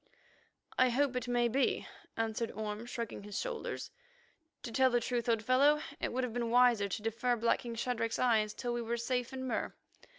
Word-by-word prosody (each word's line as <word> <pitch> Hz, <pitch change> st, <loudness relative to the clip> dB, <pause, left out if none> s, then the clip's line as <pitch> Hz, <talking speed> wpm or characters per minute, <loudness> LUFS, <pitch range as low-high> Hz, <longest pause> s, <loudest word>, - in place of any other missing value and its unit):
"I 255 Hz, 0 st, +6 dB
hope 265 Hz, +1 st, +1 dB
it 250 Hz, -1 st, -2 dB
may 240 Hz, -1 st, +2 dB
be," 265 Hz, +4 st, +1 dB, 0.3 s
answered 225 Hz, 0 st, -1 dB
Orme, 215 Hz, +1 st, -4 dB
shrugging 235 Hz, -4 st, -5 dB
his 205 Hz, 0 st, -6 dB
shoulders. -, -, -4 dB, 0.7 s
"To 235 Hz, -, -5 dB
tell 260 Hz, +3 st, +4 dB
the 240 Hz, -1 st, +2 dB
truth, 240 Hz, 0 st, -1 dB
old 225 Hz, -2 st, +2 dB
fellow, 280 Hz, +5 st, +5 dB, 0.2 s
it -, -, -2 dB
would 255 Hz, +2 st, -1 dB
have 245 Hz, -3 st, -2 dB
been 235 Hz, -1 st, -1 dB
wiser 240 Hz, -4 st, +4 dB
to 205 Hz, -, -3 dB
defer 235 Hz, +2 st, +1 dB
blacking 235 Hz, +1 st, 0 dB
Shadrach's 230 Hz, -1 st, -1 dB
eyes 220 Hz, -4 st, +2 dB
till 245 Hz, -1 st, -3 dB
we 240 Hz, -, -1 dB
were 235 Hz, +1 st, -2 dB
safe 245 Hz, +1 st, -1 dB
in 260 Hz, 0 st, -5 dB
Mur. 255 Hz, -, -2 dB
240 Hz, 190 wpm, -33 LUFS, 225-250 Hz, 0.7 s, I